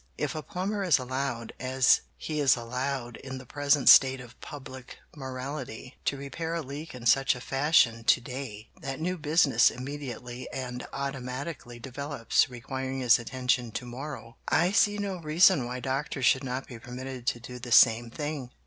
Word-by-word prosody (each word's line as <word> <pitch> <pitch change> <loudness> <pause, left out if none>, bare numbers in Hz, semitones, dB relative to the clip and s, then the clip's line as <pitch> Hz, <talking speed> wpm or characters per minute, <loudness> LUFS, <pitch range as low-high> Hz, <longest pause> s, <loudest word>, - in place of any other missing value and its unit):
If 145 -3 -2
a 155 - -4
plumber 195 +6 -3
is 180 -5 +5
allowed, 130 -2 -3
as 130 0 +4 0.2
he 155 -1 -4
is 135 -3 +5
allowed 125 0 -3
in 130 -1 -7
the 130 - -10
present 145 +2 +1
state 130 -1 +8
of 125 -1 -13
public 130 -3 -9 0.2
morality, 130 -2 -6
to 140 - 0
repair 160 +5 -4
a 165 - -2
leak 145 +2 -7
in 120 -1 -9
such 135 +2 +4
a - - -7
fashion 135 -4 +3
to - - +5
day 120 -3 -7
that 135 -2 -4
new 180 +3 -1
business 155 -3 +4
immediately 125 -2 -7
and 125 -2 -5
automatically 135 -1 -5
develops 135 0 0
requiring 130 +2 -4
his 120 -1 +5
attention 125 0 -1
to 125 - -4
morrow, 120 -1 -8
I 175 +2 +3
see 205 0 +3
no 200 -2 -3
reason 160 -3 +4
why 125 +1 -4
doctors 135 0 -2
should 130 +4 +4
not 130 0 -3
be 120 -3 -10
permitted 125 +1 -7
to 120 - +1
do 125 +1 -9
the 120 0 -8
same 115 0 +6
thing. 145 0 -4
130 Hz, 170 wpm, -28 LUFS, 125-145 Hz, 0.2 s, state